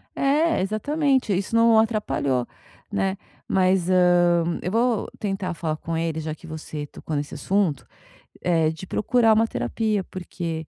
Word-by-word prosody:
É, 305 +4 +2
exatamente. 260 +4 +1
Isso 200 +4 -3
não 230 -1 +5
atrapalhou, 205 - 0 0.4
né. 190 0 0 0.3
Mas, 185 -1 +2
hã, 175 -2 +3
eu 180 - -3
vou 230 0 +1
tentar 195 -3 -2
falar 165 -2 -2
com 165 +1 -4
ele 165 -1 -1
já 155 0 -4
que 170 - -13
você 155 -2 -6
tocou 155 - -6
nesse 145 0 -4
assunto, 190 -7 0 0.6
eh, 165 -3 +2
de 160 +3 -7
procurar 225 +3 +3
uma 225 +1 +3
terapia, 215 -3 -1
porque 165 -4 -6
185 Hz, 145 wpm, -24 LUFS, 165-220 Hz, 0.6 s, não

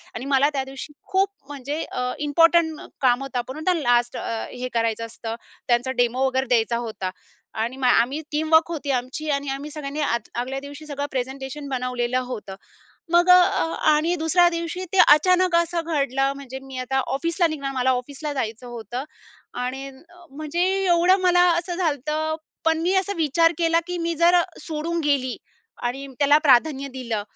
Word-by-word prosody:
आणि 245 - -5
मला 275 +1 +3
त्या 270 -2 -1
दिवशी 270 +2 -9 0.2
खूप 385 0 +3 0.2
म्हणजे 290 +2 -5
अ, 250 0 -2 0.2
इम्पोर्टंट 330 +1 +4 0.2
काम 250 -1 +3
होतं, 270 -2 -5
आपण 250 +2 -5
म्हणतो 315 +4 +1
ना 340 - -1
लास्ट 240 -2 +2
अ, 225 -1 -3
हे 250 0 -5
करायचं 230 -1 0
असतं, 225 0 -6 0.3
त्यांचा 245 +2 +2
डेमो 245 +2 +1
वगैरे 260 0 0
द्यायचा 235 -1 +2
होता. 195 -4 -4 0.4
आणि 230 +4 -3
मग 260 -2 +1
आम्ही 250 +5 +3
टीमवर्क 315 +2 +3
होती 295 -4 -3
आमची 260 +4 -3
आणि 280 0 -1
आम्ही 275 +2 -4
सगळ्यांनी 295 -1 -5
आद 235 -6 -1
आगल्या 260 +2 -3
दिवशी 285 +2 -10
सगळं 285 -1 -4
प्रेझेंटेशन 270 +2 -4
बनवलेलं 250 -1 -1
होतं. 215 -6 -7 0.6
मग 350 +1 +4
अ, - - +11
अ, 360 -3 +1 0.2
आणि 320 +4 +1
दुसऱ्या 350 +2 +4
दिवशी 335 +2 -4
ते 385 - 0
अचानक 365 +3 +5
असं 340 0 +1
घडलं. 275 -4 0
म्हणजे 265 -2 -8
मी 265 -1 -8
आता 265 +1 0
ऑफिसला 335 +5 0
निघणार, 280 -3 -4
मला 260 0 +2
ऑफिसला 275 +4 -3
जायचं 230 -2 -4
होतं 240 +2 -6 0.5
आणि 255 +2 -3
अ, 340 +6 -17
म्हणजे 305 +4 -4 0.3
एवढं 355 +2 +4
मला 355 -1 +4 0.2
असं 350 +1 -4
झालतं 310 -1 -1 0.3
पण 325 0 +3
मी 360 +3 +1
असा 385 +1 +1
विचार 330 +1 +3
केला 330 0 +3
की 355 -1 -4
मी 335 0 -1
जर 340 +2 +4
अ, 350 - +6 0.2
सोडून 330 +1 -3
गेली 270 -4 +1 0.5
आणि 255 +3 -3
त्याला 290 +1 +5
प्राधान्य 275 +2 +4
दिलं 230 -5 -3
280 Hz, 175 wpm, -23 LUFS, 255-330 Hz, 0.6 s, अ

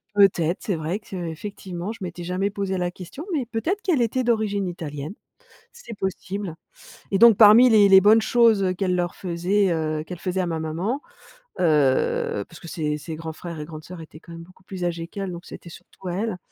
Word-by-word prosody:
peut-être. 180 -4 +3
C'est 195 - -1
vrai 165 +6 -3
qu'effectivement, 180 0 -6
je 225 - -9
m'étais 175 -1 -6
jamais 185 +3 -1
posé 195 -2 -2
la 180 -1 -1
question, 185 - -9
mais 275 -6 0
peut-être 320 - -2
qu'elle 325 - +1
était 255 +3 0
d'origine 215 -5 0
italienne. 150 -2 -6 0.6
C'est 470 - -10
possible. 190 -1 -4 0.6
Et 195 - +3
donc, 235 -2 +8
parmi 225 +4 +8
les 210 -2 +6
les 190 -1 +8
bonnes 215 +3 +6
choses 215 -5 +3
qu'elle 185 -2 +1
leur 175 0 -1
faisait 185 +2 0 0.3
qu'elle 180 -2 -7
faisait 185 +1 -2
à 180 - 0
ma 165 -1 -2
maman 175 - -2 0.6
heu, 140 - +2
parce 165 - -14
que 170 - -11
ses 150 -3 -2
ses 155 +1 -6
grands 160 0 -6
frères 170 0 -8
et 150 - -5
grandes 155 -1 -9
sœurs 180 -2 -9
étaient 155 0 -12
quand 170 - -15
même 165 0 -9
beaucoup 185 +2 -20
plus 185 -1 -5
âgées 170 -1 -3
qu'elle, 195 0 -5
donc 175 +1 -8
c'était 170 - -10
surtout 185 +2 -13
à 175 - -2
elle. 210 -2 -2
185 Hz, 200 wpm, -23 LUFS, 170-205 Hz, 0.6 s, donc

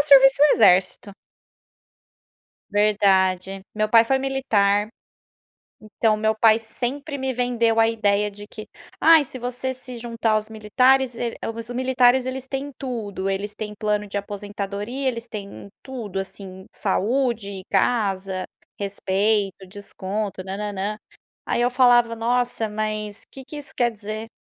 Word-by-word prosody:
eu 285 - +3
servisse 270 -1 +7
o - - +9
exército. 190 0 +3 1.6
Verdade. 195 -2 +2
Meu 215 0 0
pai 230 0 +6
foi 265 +3 +1
militar, 215 -7 +1 0.9
então 215 0 0
meu 220 +1 +1
pai 220 0 +5
sempre 265 +6 -4
me 265 0 -2
vendeu 235 -2 +1
a 225 0 +5
ideia 210 -2 +1
de 205 +1 -11
que: 215 0 -10 0.3
"Ai, 325 -2 +7
se 255 - -8
você 250 +1 -3
se 255 -1 -9
juntar 230 -1 -1
aos 215 0 0
militares, 250 +4 +2
el 235 0 -3 0.2
Os 230 +1 -8
militares 255 0 +3
eles 260 0 -4
têm 275 +2 -4
tudo, 215 -8 -4
eles 200 +2 -3
têm 210 0 -6
plano 210 0 -1
de 205 - -6
aposentadoria, 205 +5 -5
eles 235 -1 -4
têm 200 -2 -8
tudo, 230 -8 -6
assim, 190 0 -7
saúde, 210 -2 -1
casa, 195 -3 0 0.3
respeito, 200 0 -1
desconto, 200 0 -5
nã-nã-nã". 200 +2 -4 0.6
Eu 245 +1 +2
falava: 245 -2 +4
"Nossa, 240 0 0
mas 215 0 -4
que 270 - -11
que 300 - -9
isso 290 - -6
quer 240 -1 +2
dizer?" 215 0 -7
215 Hz, 135 wpm, -23 LUFS, 200-245 Hz, 1.6 s, o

